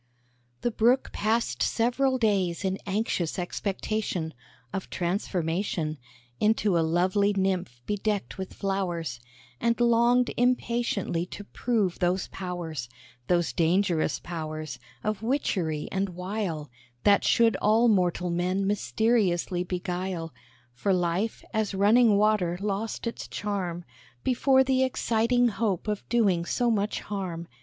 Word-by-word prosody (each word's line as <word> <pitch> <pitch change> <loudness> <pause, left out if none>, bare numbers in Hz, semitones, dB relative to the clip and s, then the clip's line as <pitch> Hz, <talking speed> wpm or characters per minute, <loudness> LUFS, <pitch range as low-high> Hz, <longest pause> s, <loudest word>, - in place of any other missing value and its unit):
The 240 - 0
Brook 240 +4 +2
passed 225 +3 0
several 260 +3 +2
days 195 -6 +1
in 190 0 -1
anxious 195 -5 -1
expectation 190 -2 -2 0.4
Of 190 - -4
transformation 170 -3 -1 0.4
Into 210 -3 +2
a 170 - +4
lovely 185 +5 +2
nymph 190 -9 -1
bedecked 205 -1 -2
with 190 - -5
flowers; 175 - -2 0.4
And 235 0 +1
longed 240 +1 +4
impatiently 235 -8 0
to 205 - -8
prove 205 -3 -1
those 180 +1 0
powers 170 -9 -5 0.4
Those 175 -1 +2
dangerous 175 0 +2
powers 155 -5 -5 0.2
of 215 -2 -1
witchery 185 - -1
and 195 0 0
wile, 180 - -4 0.3
That 200 -1 +5
should 230 -1 +4
all 220 +3 +4
mortal 180 -4 +2
men 180 +3 0
mysteriously 200 -4 +1
beguile; 180 -2 -3 0.4
For 190 +11 0
life 180 +5 -1
as 215 -3 0
running 210 +2 +5
water 205 -5 +2
lost 205 +3 -3
its 230 - -4
charm 180 -4 -3 0.4
Before 265 +1 +4
the 260 0 +2
exciting 245 -1 +2
hope 200 -3 -1
of 210 -1 -3
doing 200 -8 +3
so 240 +7 +1
much 210 -1 0
harm. 180 -5 -4
195 Hz, 120 wpm, -27 LUFS, 175-220 Hz, 0.4 s, That